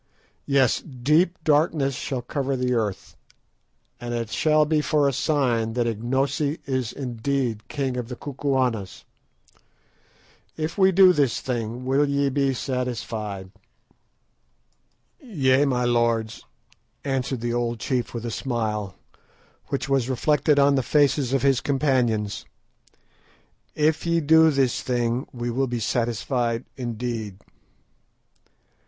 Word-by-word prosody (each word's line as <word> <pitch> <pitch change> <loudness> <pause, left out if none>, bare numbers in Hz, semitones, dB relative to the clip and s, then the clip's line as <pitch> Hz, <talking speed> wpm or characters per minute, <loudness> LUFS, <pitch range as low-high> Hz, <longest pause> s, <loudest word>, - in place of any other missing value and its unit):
Yes, 135 -4 +3
deep 150 +6 +1
darkness 150 -2 +2
shall 130 -1 -4
cover 135 +1 -2
the 125 -1 0
earth, 105 -5 -3 0.8
and 120 0 -4
it 115 -1 -3
shall 155 -1 +3
be 155 0 +1
for 150 -1 +2
a 140 - 0
sign 120 -6 0
that 120 0 0
Ignosi 135 +7 -1
is 130 -4 -2
indeed 120 -3 -3
king 135 -2 -2
of 120 -2 -3
the 125 - -6
Kukuanas. 130 -7 -2 1.5
If 155 +1 -3
we 190 -1 +4
do 185 0 +7
this 140 -8 +1
thing, 120 0 -4
will 140 +2 +2
ye 140 0 +1
be 135 0 +1
satisfied?" 115 -7 -4 1.7
"Yea, 145 - +2
my 125 -3 0
lords," 115 -2 0 0.6
answered 135 -2 -2
the 120 0 -2
old 120 -1 -1
chief 125 +1 -2
with 115 -1 -6
a 115 - -3
smile, 110 - -3 0.7
which 140 - -3
was 135 -2 +1
reflected 150 +3 +2
on 140 0 +5
the 135 - +2
faces 140 -2 +2
of 135 0 +1
his 135 -3 +3
companions; 125 -7 0 1.3
"if 155 +1 +1
ye 170 0 +2
do 160 +1 +5
this 135 -4 +1
thing, 120 0 -1
we 120 -1 -4
will 135 +3 0
be 120 -1 -3
satisfied 115 +1 -1
indeed." 115 -4 -4
130 Hz, 125 wpm, -24 LUFS, 120-140 Hz, 1.7 s, do